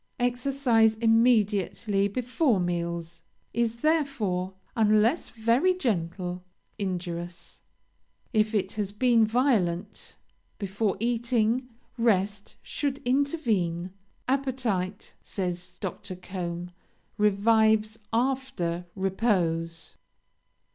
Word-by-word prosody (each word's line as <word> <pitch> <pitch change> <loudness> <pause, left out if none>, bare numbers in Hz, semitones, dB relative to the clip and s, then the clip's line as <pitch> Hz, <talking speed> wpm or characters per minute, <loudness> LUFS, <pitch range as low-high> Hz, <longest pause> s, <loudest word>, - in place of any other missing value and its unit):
Exercise 245 -2 +2
immediately 215 -3 +2
before 245 - +1
meals 170 -1 -3 0.3
is 235 0 +1
therefore, 235 - 0 0.2
unless 220 +6 +3
very 235 +11 +2
gentle, 180 - -2 0.4
injurious; 175 -2 -5 0.7
if 215 0 +2
it 195 -2 0
has 205 -2 -3
been 235 +1 +4
violent, 210 -6 0 0.4
before 200 0 -1
eating 235 +1 +1 0.3
rest 205 -2 +1
should 280 -2 -2
intervene. 230 - 0 0.4
'Appetite,' 250 -8 -1
says 180 -1 -4
Dr. 190 -1 -5
Combe, 180 -1 -5 0.5
'revives 215 +1 +3
after 235 -9 -1
repose.' 180 -5 -1
215 Hz, 80 wpm, -27 LUFS, 180-240 Hz, 0.7 s, been